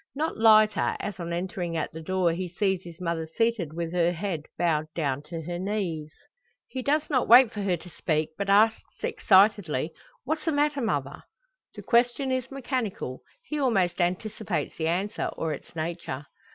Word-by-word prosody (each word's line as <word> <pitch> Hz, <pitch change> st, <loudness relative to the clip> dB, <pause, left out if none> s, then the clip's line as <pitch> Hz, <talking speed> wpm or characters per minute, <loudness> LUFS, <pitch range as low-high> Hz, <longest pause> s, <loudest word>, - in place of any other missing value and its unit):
Not 310 Hz, +3 st, -1 dB
lighter, 215 Hz, -1 st, +5 dB
as 200 Hz, -2 st, -5 dB
on 170 Hz, -1 st, -4 dB
entering 175 Hz, -1 st, -3 dB
at 155 Hz, -, -2 dB
the 160 Hz, -, -7 dB
door 185 Hz, +1 st, +1 dB
he 180 Hz, +1 st, -3 dB
sees 190 Hz, +1 st, 0 dB
his 170 Hz, -2 st, -11 dB
mother 170 Hz, -2 st, -2 dB
seated 225 Hz, -2 st, 0 dB
with 165 Hz, +1 st, -4 dB
her 175 Hz, 0 st, +2 dB
head 170 Hz, -4 st, -4 dB
bowed 155 Hz, -3 st, +1 dB
down 140 Hz, -4 st, -1 dB
to 165 Hz, 0 st, -5 dB
her 175 Hz, +2 st, -4 dB
knees. 180 Hz, -6 st, -2 dB, 0.6 s
He 260 Hz, -, -5 dB
does 295 Hz, +4 st, +1 dB
not 260 Hz, -5 st, +1 dB
wait 240 Hz, 0 st, +8 dB
for 210 Hz, -, -4 dB
her 185 Hz, -3 st, +1 dB
to 170 Hz, -, -14 dB
speak, 155 Hz, -1 st, -1 dB
but 200 Hz, +2 st, -3 dB
asks 215 Hz, +3 st, +2 dB
excitedly: 185 Hz, -7 st, +3 dB, 0.3 s
"What's 310 Hz, +5 st, -2 dB
the 320 Hz, -, +1 dB
matter, 290 Hz, -1 st, +1 dB
mother?" 140 Hz, -, -2 dB, 0.5 s
The -, -, -8 dB
question 245 Hz, +2 st, +2 dB
is 255 Hz, 0 st, -1 dB
mechanical 250 Hz, -, -3 dB, 0.2 s
he 300 Hz, -9 st, -4 dB
almost 190 Hz, -10 st, +2 dB
anticipates 190 Hz, +3 st, -2 dB
the 160 Hz, -, -1 dB
answer, 190 Hz, +5 st, -1 dB
or 160 Hz, -1 st, -1 dB
its 145 Hz, -, -10 dB
nature. 160 Hz, -4 st, -4 dB
185 Hz, 175 wpm, -27 LUFS, 165-225 Hz, 0.6 s, wait